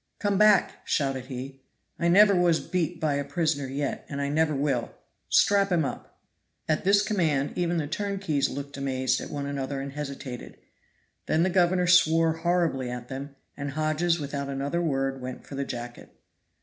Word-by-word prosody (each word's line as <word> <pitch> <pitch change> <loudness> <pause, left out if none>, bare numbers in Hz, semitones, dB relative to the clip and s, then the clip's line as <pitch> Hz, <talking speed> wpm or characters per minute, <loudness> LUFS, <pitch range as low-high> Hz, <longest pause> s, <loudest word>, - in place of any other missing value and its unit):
"Come 205 -2 0
back!" 210 -1 +5
shouted 135 -3 -1
he. 135 +1 -7 0.4
"I 170 - +1
never 200 +4 +7
was 175 -2 +3
beat 175 -2 -2
by 155 -3 +1
a 140 0 -1
prisoner 145 -1 -1
yet, 140 +1 -3
and 140 - -4
I 140 0 -1
never 155 0 +1
will. 135 -4 0 0.4
Strap 200 -1 +4
him 165 -4 +2
up." - - -7 0.5
At 155 -1 0
this 200 +2 +4
command 165 -10 0
even 175 -1 0
the 155 - 0
turnkeys 190 -3 -1
looked 140 +1 -6
amazed 130 -2 0
at - - -7
one 140 -1 -4
another 140 -1 -3
and 135 0 -5
hesitated. 140 -3 -7 0.7
Then 160 +1 +2
the 185 - +1
governor 180 0 +3
swore 165 -2 +5
horribly 165 -7 0
at 125 0 -6
them, 135 +1 -6 0.2
and 140 0 -4
Hodges 155 +3 +1
without 140 -1 -4
another 140 +5 -2
word 135 -4 -1
went 125 0 -7
for - - -11
the 140 0 -2
jacket. 120 -1 -7
145 Hz, 175 wpm, -27 LUFS, 135-175 Hz, 0.7 s, never